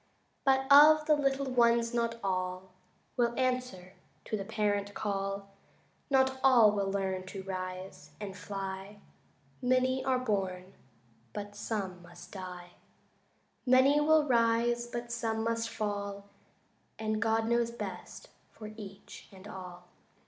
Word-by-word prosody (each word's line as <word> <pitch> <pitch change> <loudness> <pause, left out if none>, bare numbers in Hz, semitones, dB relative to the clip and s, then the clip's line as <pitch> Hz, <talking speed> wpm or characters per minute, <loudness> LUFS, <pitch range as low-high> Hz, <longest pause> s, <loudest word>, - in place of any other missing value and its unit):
But 265 -1 +4
of 305 +2 +8
the 305 -1 +5
little 275 -1 0
ones 235 -1 +3
not 235 -1 0
all 185 -1 -2 0.5
Will 240 -1 +2
answer 250 -8 -2 0.3
to - - -2
the 200 - -3
parent 205 0 -1
call, 195 -1 -3 0.6
Not 265 -1 +3
all 240 -6 +7
will 200 -1 -1
learn 190 -1 -2
to 190 0 -7
rise 185 -4 -6
and 200 -2 -6
fly 195 0 -6 0.6
Many 255 +1 +2
are 260 -1 +2
born, 195 -6 -2 0.6
but 205 0 -6
some 200 -4 -4
must 175 0 -13
die; 180 -2 -8 0.9
Many 265 +3 +5
will 310 0 +4
rise, 235 0 +2
but 240 0 -6
some 225 -1 -1
must 230 0 -1
fall, 200 -2 -4 0.7
And 215 0 -2
God 225 0 +2
knows 235 0 +2
best 235 - -8 0.2
for 215 -1 -9
each 200 -3 -11
and 190 +1 -13
all. 180 -3 -9
215 Hz, 125 wpm, -31 LUFS, 195-240 Hz, 0.9 s, of